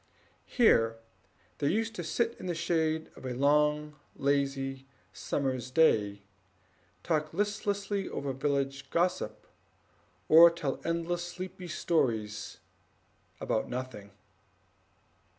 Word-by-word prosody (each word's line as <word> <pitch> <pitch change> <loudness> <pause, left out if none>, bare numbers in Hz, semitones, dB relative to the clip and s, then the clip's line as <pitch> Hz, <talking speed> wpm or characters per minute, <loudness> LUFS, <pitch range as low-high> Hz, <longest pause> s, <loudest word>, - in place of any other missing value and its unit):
Here 115 - +4 0.6
they 140 - +1
used 225 +6 0
to - - -5
sit 235 0 0
in 185 - -6
the 175 - -1
shade 160 -1 -1
through 130 -1 -6
a - - -7
long 150 +2 +2 0.2
lazy 135 -1 -1 0.3
summer's 130 -3 -2
day, 105 -9 +3 0.8
talking 155 0 -1
listlessly 205 -1 -1
over 140 -1 -3
village 135 0 -2
gossip, 180 +2 -1 0.8
or 165 +2 +9
telling 160 -5 -4
endless 170 +1 -1
sleepy 180 +1 -7
stories 110 -11 -1 0.8
about 110 - -1
nothing. 125 -5 -6
150 Hz, 100 wpm, -30 LUFS, 135-175 Hz, 0.8 s, or